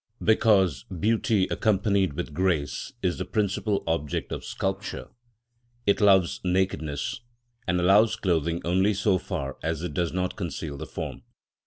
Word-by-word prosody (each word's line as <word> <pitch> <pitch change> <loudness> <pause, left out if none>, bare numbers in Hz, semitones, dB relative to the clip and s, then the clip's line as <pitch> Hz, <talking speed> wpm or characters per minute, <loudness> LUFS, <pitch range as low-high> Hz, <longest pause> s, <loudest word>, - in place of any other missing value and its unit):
Because 95 - +3
beauty 105 +2 +1
accompanied 100 -4 +2
with 85 -1 -5
grace 85 - -1
is 90 -2 0
the - - -1
principal 100 +1 -1
object 80 -3 -2
of - - -4
sculpture, 95 +1 -4 0.8
it 100 - +2
loves 95 -4 +4
nakedness, 90 -5 -1 0.5
and 90 0 +2
allows 100 +5 +5
clothing 85 -2 0
only 95 +4 +2
so 100 -1 +2
far 70 -4 -5
as 80 0 -2
it 90 - -4
does 85 -3 0
not 90 0 -2
conceal 80 -6 -4
the 70 - -7
form. - - -6
95 Hz, 140 wpm, -26 LUFS, 85-100 Hz, 0.8 s, allows